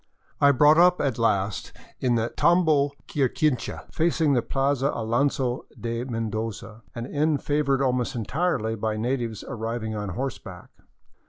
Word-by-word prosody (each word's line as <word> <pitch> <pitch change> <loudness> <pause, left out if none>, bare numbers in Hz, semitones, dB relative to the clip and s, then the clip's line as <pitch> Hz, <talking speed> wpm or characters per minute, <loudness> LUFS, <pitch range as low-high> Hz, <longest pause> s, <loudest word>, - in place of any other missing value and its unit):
I 140 - +6
brought 150 +4 +5
up 180 +1 +5
at 130 -5 -1
last 100 -3 0 0.3
in 125 -2 +1
the 115 0 0
" - - -25
Tambo 155 -5 +3
Quirquincha," 140 -1 -1
facing 160 -2 +2
the 125 - +3
Plaza 135 +1 0
Alonzo 125 +2 0
de 115 0 -3
Mendoza, 110 -2 -4
an 115 - -4
inn 150 +2 +1
favored 140 -1 0
almost 125 -2 0
entirely 120 - -1
by 110 0 -2
natives 115 -2 -2
arriving 115 -2 -4
on 105 -1 -4
horseback. 135 +2 -6
125 Hz, 140 wpm, -25 LUFS, 115-145 Hz, 0.3 s, I